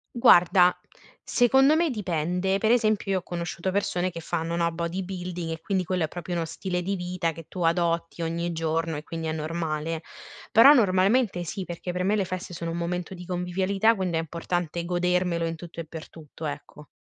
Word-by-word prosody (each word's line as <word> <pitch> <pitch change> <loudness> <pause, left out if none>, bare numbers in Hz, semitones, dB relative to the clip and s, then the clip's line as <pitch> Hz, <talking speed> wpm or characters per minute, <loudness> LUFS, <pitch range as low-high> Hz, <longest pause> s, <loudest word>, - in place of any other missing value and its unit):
Guarda, 180 -4 +6 0.5
secondo 265 +4 +4
me 335 0 +2
dipende, 180 -2 0
per 220 +3 +2
esempio 215 -4 +2
io 190 - +2
ho - - -12
conosciuto 175 +1 -4
persone 185 -2 0
che 170 - -7
fanno, 165 0 -2
no, 170 0 +1
body 170 +3 -3
building 180 -2 -5
e 160 - -4
quindi 190 -3 0
quello 180 -1 0
è - - -5
proprio 175 +2 -6
uno 170 -1 -1
stile 180 +2 -3
di 195 +3 -1
vita 180 -2 -2
che 165 -1 -10
tu 180 - -7
adotti 170 0 0
ogni 170 +1 -2
giorno 165 -1 -1
e 150 - -7
quindi 165 0 -5
è - - -1
normale; 160 0 -3 0.5
però 270 +6 +9
normalmente 195 -2 +3
sì 190 +3 -5
perché 175 +1 -5
per 180 +1 -2
me 200 +3 +2
le 200 -2 +1
feste 185 0 -5
sono 165 0 -4
un 170 - -3
momento 175 +1 -3
di 180 -1 -9
convivialità, 190 +5 +1
quind 185 -3 -2
è - - +2
importante 170 +1 -2
godermelo 180 -1 +1
in 165 - -2
tutto 170 +1 -10
e 165 - -8
per 160 0 -9
tutto, 160 0 -10
ecco. 150 0 -7
175 Hz, 200 wpm, -26 LUFS, 165-190 Hz, 0.5 s, però